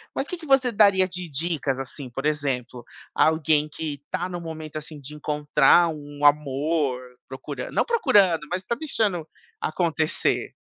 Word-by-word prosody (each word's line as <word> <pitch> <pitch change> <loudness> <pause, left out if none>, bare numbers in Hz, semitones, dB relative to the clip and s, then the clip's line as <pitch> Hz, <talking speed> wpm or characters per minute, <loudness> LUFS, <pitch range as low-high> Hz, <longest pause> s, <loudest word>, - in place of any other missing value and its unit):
mas 275 - -2
que 360 - -5
que 325 - -11
você 265 -3 +3
daria 200 -3 +5
de 180 -1 -6
dicas, 145 -3 -2
assim, 135 0 -7
por 135 +4 -5
exemplo, 130 -5 -2 0.3
alguém 155 -1 +3
que 150 -2 -5
tá 185 0 -2
no 175 -1 -5
momento, 160 -2 -7
assim, 150 0 -8
de 145 +2 -10
encontrar 150 +2 +3
um 145 -1 -8
amor, 145 -2 +2 0.3
procuran 130 0 -7
não - - +2
procurando, 200 - +3
mas 185 +1 -2
tá 235 +5 -2
deixando 210 - -1 0.3
acontecer. 160 -2 -1
155 Hz, 150 wpm, -24 LUFS, 145-180 Hz, 0.3 s, daria